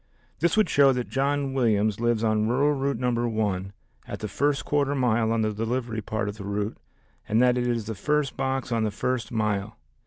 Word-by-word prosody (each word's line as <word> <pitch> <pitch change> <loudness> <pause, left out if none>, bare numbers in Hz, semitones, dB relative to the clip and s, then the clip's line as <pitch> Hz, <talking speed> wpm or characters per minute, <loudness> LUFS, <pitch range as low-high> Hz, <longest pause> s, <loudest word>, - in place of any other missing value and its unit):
This 170 +7 +1
would 215 - +4
show 140 -1 +5
that 125 -1 -3
John 140 0 0
Williams 110 -5 +1
lives 120 -1 +1
on 110 -1 +2
rural 140 +5 +2
route 140 -2 -1
number 120 -1 0
one, 100 -4 -1 0.4
at - - -5
the 105 - -4
first 140 +5 0
quarter 145 -1 +1
mile 120 -4 +2
on 115 -1 +1
the 110 0 0
delivery 115 +1 -2
part 105 0 -3
of 105 +1 -5
the 100 - -7
route, 100 +2 -3 0.5
and 110 +2 +3
that 125 0 +4
it 125 0 0
is 115 -3 -1
the 110 - -4
first 150 +6 0
box 135 -1 -2
on 115 -1 +1
the 110 - +1
first 115 +2 -2
mile. 105 -2 -1
115 Hz, 210 wpm, -26 LUFS, 110-135 Hz, 0.5 s, show